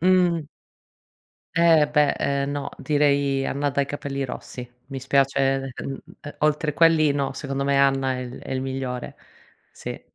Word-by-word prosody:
Mh. 175 -3 +3 1.1
Eh 165 -3 +5
beh, 150 -1 +4
ehm, 140 0 -1
no, 145 -1 -4
direi 140 -2 +2
Anna 145 +2 -1
dai 140 0 +1
capelli 140 -1 -4
rossi. 125 -1 -7 0.2
Mi 135 -1 -6
spiace, 135 +1 +2 0.4
ehm, 135 -1 -5 0.2
ehm, 145 - -9
oltre 150 0 +1
quelli 165 -3 +5
no, 140 -1 -1
secondo 140 -1 -3
me 140 0 +2
Anna 135 -1 +3
è 130 - -3
il 125 0 -7
è - - -7
il 130 - -1
migliore. 130 -2 -4 0.6
Sì. - - -7
140 Hz, 155 wpm, -24 LUFS, 135-150 Hz, 1.1 s, Eh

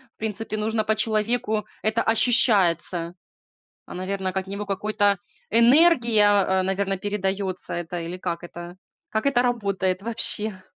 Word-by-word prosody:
В - - -59
принципе, 215 0 -3
нужно 215 +1 -1
по 220 0 0
человеку 215 -1 -1 0.2
это 220 +2 0
ощущается. 190 -7 +2 0.7
А, - - -10
наверно, 190 +1 -3
от 190 0 -4
него 200 +1 -5
какой-то 205 0 0 0.3
энергия, 235 -3 +5
а, 190 -2 +2
наверно, 195 0 -1
передаётся 195 -2 -2
это 175 0 -5
или 175 +2 -6
как 170 -2 -4
это 175 +1 -10 0.3
как 220 +3 -2
это 260 -3 +3
работает 200 -6 -1
вообще? 215 -3 -1
205 Hz, 135 wpm, -24 LUFS, 185-220 Hz, 0.7 s, энергия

